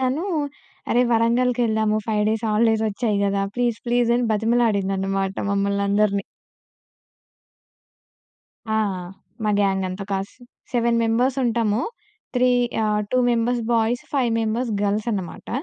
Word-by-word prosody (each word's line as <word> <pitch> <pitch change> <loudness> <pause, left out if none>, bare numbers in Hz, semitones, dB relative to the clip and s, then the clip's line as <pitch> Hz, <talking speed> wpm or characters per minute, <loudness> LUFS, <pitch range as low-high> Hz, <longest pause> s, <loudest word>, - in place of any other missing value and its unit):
తను, 265 +6 0 0.7
"అరే! 245 - +4
వరంగల్‌కెళ్దాము. 230 -2 +2
5 210 -1 +1
days 220 +1 -2
holidays 220 +1 +2
వచ్చాయి 210 0 -1
కదా! 200 0 0
ప్లీజ్, 240 -3 0
ప్లీజ్" 240 0 +2
అని 245 - +1
బతిమలాడిందన్నమాట 195 -4 0 0.2
మమ్మల్నందరిని. 200 0 +1 2.4
ఆ! 220 0 0 0.7
మా 210 - +2
గ్యాంగ్ 195 -1 +1
అంతా 185 +2 -5
కాస్ 195 +1 -3 0.4
సెవెన్ 235 -1 +2
మెంబర్స్ 245 +4 +1
ఉంటాము. 230 -2 +1 0.5
త్రీ 250 0 +3 0.4
ఆహ్, 210 0 +1
to 255 - +3
members 240 +1 +1
boys, 230 +2 +1
five 260 -5 +1
members 225 +2 -1
girls 205 +2 0
అన్నమాట 190 -4 -5
220 Hz, 115 wpm, -22 LUFS, 200-240 Hz, 2.4 s, అరే